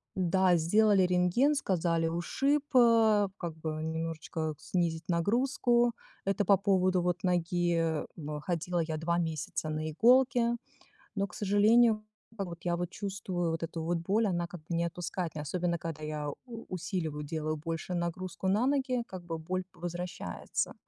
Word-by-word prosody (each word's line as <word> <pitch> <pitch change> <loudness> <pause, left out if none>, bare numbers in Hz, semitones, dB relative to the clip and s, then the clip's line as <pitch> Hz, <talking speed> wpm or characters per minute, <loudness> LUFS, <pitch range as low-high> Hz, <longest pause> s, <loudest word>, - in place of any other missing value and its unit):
Да, 185 0 +3
сделали 200 +4 +4
рентген, 180 +11 +3
сказали 170 - +1
ушиб, 270 - 0
э, 225 -4 +5
как 170 -3 -5
бы 160 0 -4
немножечко 160 -1 -3
снизить 165 -2 -2
нагрузку. 240 +6 +2 0.3
Это 195 +1 +1
по 200 0 +5
поводу 185 -2 +2
вот 180 +1 -1
ноги 170 -2 +1
бэ 150 -2 -5
ходила 175 +1 -1
я 160 -1 -1
2 170 +2 0
месяца 160 -1 -3
на 155 0 -2
иголки, 240 - +4 0.6
но, 200 0 0
к - - -14
сожалению, 215 +2 +4 0.3
как 195 -3 -3
вот 170 -1 -8
я 175 - +1
вот 175 0 -2
чувствую 190 -4 -3
вот 165 - -3
эту 165 0 -4
вот 170 0 0
боль, 200 +7 +1
она 175 -3 0
как 175 -2 -10
бы 165 +2 -4
не 170 0 +1
отпускает 170 0 -4
меня, 150 - -4
особенно 170 +2 -1
когда 160 -2 -6
я 150 -1 -3
у 230 - -9
усиливаю, 160 -5 -3
делаю 155 +1 -2
больше 165 +3 -4
нагрузку 175 +2 -3
на 210 +6 +3
ноги, 265 -3 +1
как 185 -2 -8
бы 165 -1 -4
боль 185 +3 -3
возвращается. 175 - -4
175 Hz, 160 wpm, -30 LUFS, 165-200 Hz, 0.6 s, э